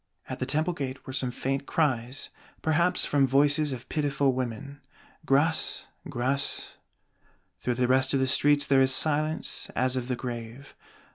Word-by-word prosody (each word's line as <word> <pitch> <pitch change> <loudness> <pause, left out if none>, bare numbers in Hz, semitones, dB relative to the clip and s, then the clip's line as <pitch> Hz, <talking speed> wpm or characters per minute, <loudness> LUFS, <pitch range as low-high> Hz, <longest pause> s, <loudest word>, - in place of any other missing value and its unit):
At - - -6
the 130 - -2
Temple 155 +5 +1
gate 135 -4 -6
were 130 - -7
some 130 -1 +1
faint 135 +3 -3
cries, 130 -3 -1 0.3
perhaps 170 +3 +2
from 140 -2 +2
voices 145 +2 +3
of 125 -1 -6
pitiful 140 -3 0
women: 130 +3 -5 0.5
"Grâce! 150 +4 +1 0.2
Grâce!" 135 +4 -2 0.9
Through 125 - -1
the 125 0 +1
rest 130 +1 +3
of - - +2
the 130 - +2
streets 145 +2 +3
there 135 -1 +4
is 130 0 +4
silence 155 +3 0
as 130 0 +1
of 125 -1 -3
the 125 - -1
grave. 120 +2 -7
135 Hz, 155 wpm, -27 LUFS, 130-145 Hz, 0.9 s, there